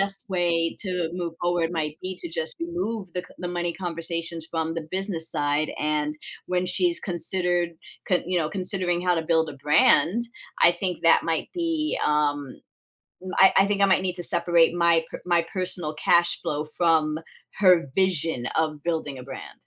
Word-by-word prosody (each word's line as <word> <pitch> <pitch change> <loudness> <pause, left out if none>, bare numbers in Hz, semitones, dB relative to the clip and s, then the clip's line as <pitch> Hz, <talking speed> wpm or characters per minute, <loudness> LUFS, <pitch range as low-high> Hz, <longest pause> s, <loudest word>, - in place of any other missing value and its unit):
best 195 +1 -2
way 170 -2 +1
to 180 -4 -2
move 175 -2 -4
forward 175 -1 +1
might 155 -2 -3
be 185 0 -4
to 345 - -5
just 485 0 -2
remove 230 - -4
the 180 - -2
c 180 - -15
the 180 - -4
money 175 -1 -2
conversations 170 -2 -3
from 160 -1 -2
the 165 -2 -5
business 185 -4 -1
side 145 +1 0
and 150 0 0 0.3
when 180 0 0
she's 180 -1 +2
considered 175 -1 0 0.4
c 180 -3 +2
you 180 0 +1
know, 155 -2 0
considering 185 -1 -1
how 180 -1 +2
to 165 - 0
build 160 0 +1
a 140 - -10
brand, 165 +7 +4 0.4
I 170 - +8
think 180 0 -4
that 165 - +5
might 165 -1 -1
be, 330 -3 -1
um, 145 -2 0 0.8
I 190 - +7
I 195 - +4
think 205 -1 0
I - - +7
might 190 -1 +3
need 185 -1 -2
to 175 - -4
separate 170 -1 +3
my 170 -1 +3
p - - -6
my 170 -2 +2
personal 180 -4 -2
cash 175 +2 +3
flow 150 +1 -2
from 160 -3 +2 0.4
her 180 -6 +5
vision 165 -9 0
of 155 -2 -1
building 160 -5 -2
a - - -8
brand. 135 0 -9
175 Hz, 180 wpm, -25 LUFS, 160-185 Hz, 0.8 s, I